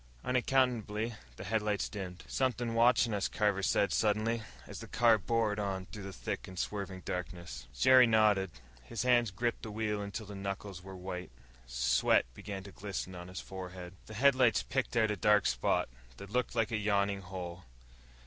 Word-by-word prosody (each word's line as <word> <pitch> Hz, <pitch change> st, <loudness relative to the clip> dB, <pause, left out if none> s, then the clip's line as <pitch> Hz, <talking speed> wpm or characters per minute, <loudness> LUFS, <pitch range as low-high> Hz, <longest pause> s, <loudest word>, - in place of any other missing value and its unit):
Unaccountably, 120 Hz, -4 st, +1 dB, 0.2 s
the -, -, -8 dB
headlights 105 Hz, -2 st, 0 dB
dimmed. 90 Hz, -3 st, -7 dB
"Somethin' 125 Hz, -3 st, 0 dB
watchin' 115 Hz, 0 st, +4 dB
us," 100 Hz, -2 st, 0 dB
Carver 105 Hz, -2 st, +1 dB
said 100 Hz, +1 st, +2 dB
suddenly, 110 Hz, +2 st, +1 dB, 0.2 s
as -, -, -8 dB
the -, -, -8 dB
car 115 Hz, -2 st, +4 dB
bored 110 Hz, +1 st, 0 dB
on 95 Hz, -2 st, -2 dB
through 105 Hz, -, -9 dB
the 100 Hz, 0 st, -6 dB
thick -, -, -5 dB
and 95 Hz, -, -10 dB
swirling 95 Hz, -1 st, -3 dB
darkness. 90 Hz, -6 st, -5 dB
Jerry 130 Hz, -, +7 dB
nodded. 105 Hz, -4 st, +4 dB, 0.3 s
His 115 Hz, -, -4 dB
hands 120 Hz, -2 st, +4 dB
gripped 120 Hz, +5 st, -2 dB
the 110 Hz, -, -6 dB
wheel 105 Hz, -1 st, -2 dB
until 100 Hz, +2 st, -5 dB
the 100 Hz, -, -9 dB
knuckles 100 Hz, -1 st, -5 dB
were 95 Hz, +1 st, -9 dB
white. 90 Hz, 0 st, -6 dB, 0.4 s
Sweat -, -, +3 dB
began 95 Hz, +7 st, -6 dB
to 100 Hz, -, -10 dB
glisten 95 Hz, -1 st, -5 dB
on 90 Hz, 0 st, -8 dB
his 90 Hz, 0 st, -6 dB
forehead. 90 Hz, -1 st, -8 dB
The 110 Hz, -, -9 dB
headlights 130 Hz, -1 st, +4 dB
picked 130 Hz, -2 st, -1 dB
out 110 Hz, -2 st, +3 dB
a -, -, 0 dB
dark 105 Hz, +1 st, +4 dB
spot, 60 Hz, 0 st, +1 dB, 0.3 s
that 100 Hz, +5 st, -10 dB
looked 125 Hz, 0 st, 0 dB
like 115 Hz, 0 st, +1 dB
a 115 Hz, -, +1 dB
yawning 100 Hz, -1 st, +1 dB
hole. 90 Hz, -2 st, -7 dB
105 Hz, 175 wpm, -32 LUFS, 95-115 Hz, 0.4 s, Jerry